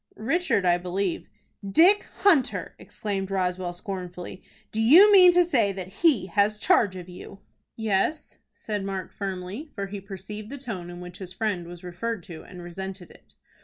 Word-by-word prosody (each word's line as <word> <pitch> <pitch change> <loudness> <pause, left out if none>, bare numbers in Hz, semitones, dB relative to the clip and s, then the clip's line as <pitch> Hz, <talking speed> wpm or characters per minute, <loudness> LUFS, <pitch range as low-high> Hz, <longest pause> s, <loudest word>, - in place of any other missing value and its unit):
"Richard 225 - 0
I 175 0 +3
believe." 180 +1 -2 0.4
"Dick 345 - +4 0.2
Hunter!" 335 -10 +3
exclaimed 195 -2 -4
Roswell, 180 -2 -1
scornfully, 180 0 -7 0.3
"Do 220 - -1
you 340 - +8
mean 365 -3 +9
to 355 0 +5
say 235 - +2
that 185 +1 -9
he 285 - +4
has 205 +3 +1
charge 205 -2 +3
of 180 -1 -8
you?" 185 +2 -11 0.3
"Yes," 220 +8 -1
said 210 -2 -5
Mark, 195 -2 -5
firmly, 195 - -5
for 200 -3 -3
he 195 0 -7
perceived 205 +2 -8
the 280 - -6
tone 200 -10 -6
in 175 0 -9
which 180 +2 -10
his 185 -1 -8
friend 190 -4 -2
was 175 0 -11
referred 180 +3 -4
to, 160 -2 -10
and 180 -2 -11
resented 190 +1 -7
it. - - -20
195 Hz, 165 wpm, -26 LUFS, 180-225 Hz, 0.4 s, mean